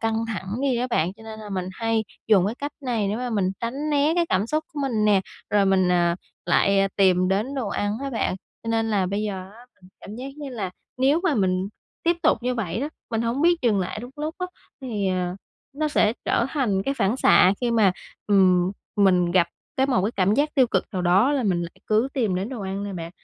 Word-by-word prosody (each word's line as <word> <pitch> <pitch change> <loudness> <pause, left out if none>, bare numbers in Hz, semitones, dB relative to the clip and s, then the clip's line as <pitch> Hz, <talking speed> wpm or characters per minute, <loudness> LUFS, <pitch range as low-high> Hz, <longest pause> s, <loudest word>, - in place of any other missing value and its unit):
căng 225 0 0
thẳng 205 -1 -4
đi 265 -3 +2
đó 245 +1 0
bạn. 175 -4 +1
Cho 220 - -15
nên 220 -1 -9
là 210 -1 -9
mình 185 -2 -3
hay 225 +2 0 0.2
dùng 195 -4 +5
cái 215 - -2
cách 285 +3 -5
này 235 -7 -1
để 205 - -1
mà 250 +1 -3
mình 200 -4 +1
tránh 270 +6 -3
né 290 +2 +3
cái 345 -1 +2
cảm 190 +3 +1
xúc 310 +5 -1
của 295 - -4
mình 230 -6 0
nè. 205 -2 +4 0.3
Rồi 205 -1 +4
mình, 190 -1 +3
à, 175 -1 +2 0.3
lại 195 0 +3
tìm 185 -2 +4
đến 210 +8 0
đồ 255 -6 -2
ăn 205 +2 -2
á 275 - -3
bạn. 230 -6 -1 0.3
Cho 230 - -6
nên 225 0 +1
là 195 -3 +1
bây 200 +3 -2
giờ 190 -3 -4
á, 235 +3 -16
mình 185 -2 -20
cảm 210 - -9
giác 255 +2 -6
như 295 -2 -6
là 210 -7 -4 0.3
nếu 275 +5 +3
mà 335 -5 +3
mình 190 -3 +1 0.3
tiếp 340 0 +2
tục - - +3
như 250 +1 0
vậy 210 -3 -2
đó, 285 - -2 0.2
mình 225 -1 0
hổng 235 +5 -1
biết 345 +1 +5
dừng 215 -5 +3
lại 185 +3 -3
đúng 245 +2 -8
lúc 305 +2 -3
á, 365 - -2 0.3
thì, 215 -7 -2
ờ, 180 -1 -1 0.4
nó 305 +2 -1
sẽ 220 -7 +3
trở 235 - +1
thành 215 -10 0
cái 275 +6 -1
phản 220 -2 +1
xạ 190 -7 +5
khi 245 -1 0
mà, 215 -5 +4 0.3
ừm, 185 -2 +4 0.2
mình 180 -4 +4
gặp 175 -1 +3 0.3
cái 265 - +3
một 250 -9 +2
cái 220 - -1
cảm 195 +1 +3
giác 295 +4 +1
tiêu 260 -3 +5
cực - - 0
nào 185 -2 -2
đó 190 +10 +4
là 280 -3 +1
mình 180 -5 +1
lại 170 - -5 0.2
cứ 220 +4 +2
tìm 225 -8 +1
đến 190 +4 -2
đồ 250 -4 -6
ăn 195 +1 -3
nè 200 - -5
bạn. 170 -2 -6
215 Hz, 245 wpm, -24 LUFS, 190-250 Hz, 0.4 s, dùng